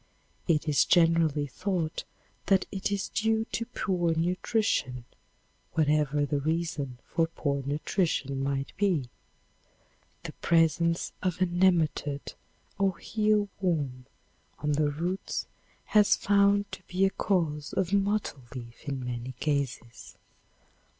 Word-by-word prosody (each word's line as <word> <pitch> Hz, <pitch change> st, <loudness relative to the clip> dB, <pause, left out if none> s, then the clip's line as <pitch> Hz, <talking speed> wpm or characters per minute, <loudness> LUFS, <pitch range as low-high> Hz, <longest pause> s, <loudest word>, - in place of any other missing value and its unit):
It 160 Hz, -2 st, +2 dB
is 150 Hz, -2 st, +4 dB
generally 165 Hz, -4 st, +3 dB
thought 170 Hz, +3 st, -2 dB, 0.4 s
that 195 Hz, -1 st, +4 dB
it 195 Hz, 0 st, -2 dB
is 200 Hz, -1 st, -1 dB
due 220 Hz, 0 st, +1 dB
to 230 Hz, -, -2 dB
poor 175 Hz, -4 st, 0 dB
nutrition, 175 Hz, -, 0 dB, 0.7 s
whatever 150 Hz, -2 st, +2 dB
the 145 Hz, 0 st, -1 dB
reason 155 Hz, -4 st, -2 dB
for 165 Hz, -1 st, +1 dB
poor 140 Hz, -4 st, -2 dB
nutrition 140 Hz, -1 st, -1 dB
might 135 Hz, 0 st, -2 dB
be. 180 Hz, -11 st, +1 dB, 1.1 s
The -, -, -5 dB
presence 165 Hz, 0 st, +2 dB
of 180 Hz, -2 st, -1 dB
a 185 Hz, -, +4 dB
nematode 170 Hz, -5 st, +1 dB, 0.5 s
or 195 Hz, -2 st, +2 dB, 0.2 s
eel 210 Hz, -1 st, +3 dB
worm 145 Hz, -9 st, -1 dB, 0.5 s
on 150 Hz, +3 st, -1 dB
the 150 Hz, 0 st, +2 dB
roots 175 Hz, +6 st, -3 dB, 0.4 s
has 210 Hz, -1 st, +5 dB
found 200 Hz, 0 st, +3 dB
to -, -, -7 dB
be 185 Hz, +2 st, +2 dB
a 195 Hz, -, +2 dB
cause 155 Hz, -8 st, -1 dB
of 190 Hz, 0 st, 0 dB
mottle 200 Hz, -7 st, 0 dB
leaf 120 Hz, 0 st, -9 dB
in 135 Hz, -2 st, -3 dB
many 125 Hz, +1 st, -4 dB
cases. 135 Hz, -3 st, -3 dB
165 Hz, 120 wpm, -28 LUFS, 145-190 Hz, 1.1 s, has